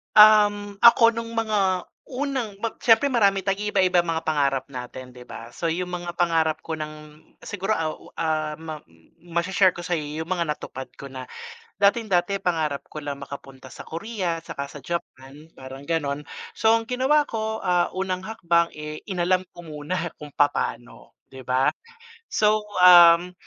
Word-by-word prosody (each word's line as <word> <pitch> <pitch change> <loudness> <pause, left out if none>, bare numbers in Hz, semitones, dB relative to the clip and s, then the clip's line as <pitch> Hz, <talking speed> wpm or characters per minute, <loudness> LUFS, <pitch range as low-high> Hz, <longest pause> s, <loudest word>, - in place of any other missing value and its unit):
Um, 205 -1 +6
ako 230 0 +7
nung 230 0 -6
mga 200 -5 +1 0.2
unang 260 -6 -3
bap 230 - -3
siyempre 240 +4 +4
marami 200 -5 +3
tayong 200 +2 -1
iiba-iba 185 -3 +3
mga 165 -1 -1
pangarap 140 -4 0
natin 125 0 -8
'di 125 0 -14
ba? 115 +1 -9
So 165 - -3
yung 180 +2 -2
mga 175 -1 -5
pangarap 160 -2 +1
ko 165 - -7
ng 150 0 -9 0.2
siguro 205 +1 -2
aw 160 -3 -1 0.2
ah, 155 -2 -1
ma 160 -1 -8 0.4
masha-share 175 +2 +1
ko 175 - -7
sayo 175 -2 -1 0.2
yung 165 - -16
mga 170 -3 0
natupad 130 -3 -5
ko 140 -1 -10
na. 130 -1 -8 0.5
Dating-dati 200 -2 +2
pangarap 155 -5 -1
ko 155 - -6
lang 140 -1 -6
makapunta 135 -2 -11
sa - - -11
Korea 180 -1 -3
tsaka 140 -4 -6
sa 140 -3 -12
Japan, 150 -3 -7
parang 135 +1 -10
ganon. 150 -3 -1 0.3
So, 225 +1 +3
ang 225 - -3
ginawa 265 +5 +2
ko, 220 -3 -4
ah, 180 -1 +2
unang 185 -1 -2
hakbang, 170 -5 +1
eh, 150 0 -7
inalam 185 0 0
ko 175 - -13
muna 160 +3 -4
kung 150 - -8
papano, 125 -4 -2
di 130 0 -13
ba? 130 +1 +1 0.6
So, 215 0 +2 0.2
um, 175 0 +8
175 Hz, 160 wpm, -24 LUFS, 150-205 Hz, 0.6 s, um